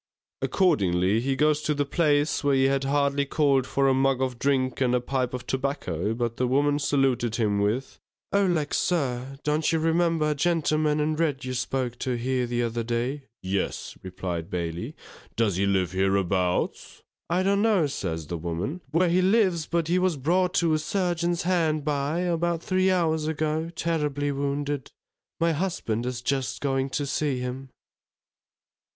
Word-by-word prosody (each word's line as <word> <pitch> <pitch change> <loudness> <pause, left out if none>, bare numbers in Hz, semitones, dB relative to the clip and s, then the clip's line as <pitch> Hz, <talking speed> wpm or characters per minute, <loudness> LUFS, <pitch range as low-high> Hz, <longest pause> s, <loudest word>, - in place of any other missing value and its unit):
Accordingly 95 - +2
he 135 +3 0
goes 150 +1 +2
to 150 -1 0
the 145 0 0
place, 150 -1 +1
where 140 -1 +3
he 135 - +3
had 135 0 +2
hardly 140 0 +1
called 140 -2 +2
for 135 0 +1
a 135 - +4
mug 135 0 +2
of 130 -2 -2
drink 135 -2 0
and 125 -1 +3
a - - +3
pipe 125 0 -1
of 125 -1 -6
tobacco, 115 - -2
but 115 -1 -2
the 125 - +1
woman 145 +3 +2
saluted 135 -5 +1
him 105 -3 +1
with, 110 +6 -1 0.3
O 200 -1 +3
lack, 155 -5 0
sir! 135 -6 -1
Don't 150 +1 +1
you 165 - +2
remember 165 -1 +2
a - - +2
gentleman 155 -1 +1
in 155 +1 0
red 150 -5 0
you 130 - -3
spoke 125 -1 -2
to 125 -2 -1
here 125 +1 -1
the 120 0 -1
other 115 0 -2
day? 120 +5 -2 0.2
Yes, 95 +1 -2
replied 90 -3 -5
Bailey, 85 -1 -4 0.4
_does 105 -6 +1
he 100 +1 +1
live 95 -3 +1
hereabouts? 95 -1 0 0.3
I 180 +2 +1
don't 200 +1 +2
know, 210 -7 +3
says 85 - -3
the 85 +2 -5
woman, 90 - -3
where 165 +5 +2
he 175 +2 +3
lives, 185 -5 +2
but 170 -2 0
he 175 +2 +2
was 180 -4 +1
brought 180 +7 +1
to 170 -4 +3
a 155 - +2
surgeon's 175 0 -1
hard 160 -4 +1
by, 150 +3 0
about 170 -1 0
three 185 0 +2
hours 160 -4 +1
ago, 155 +1 -1
terribly 150 -4 -1
wounded. 140 0 -2 0.5
My 165 0 +3
husband 145 - -2
is 125 -1 -4
just 135 0 -1
going 135 -1 0
to 145 +2 -2
see 140 -1 -1
him. 125 +2 -5
140 Hz, 170 wpm, -26 LUFS, 120-160 Hz, 0.5 s, a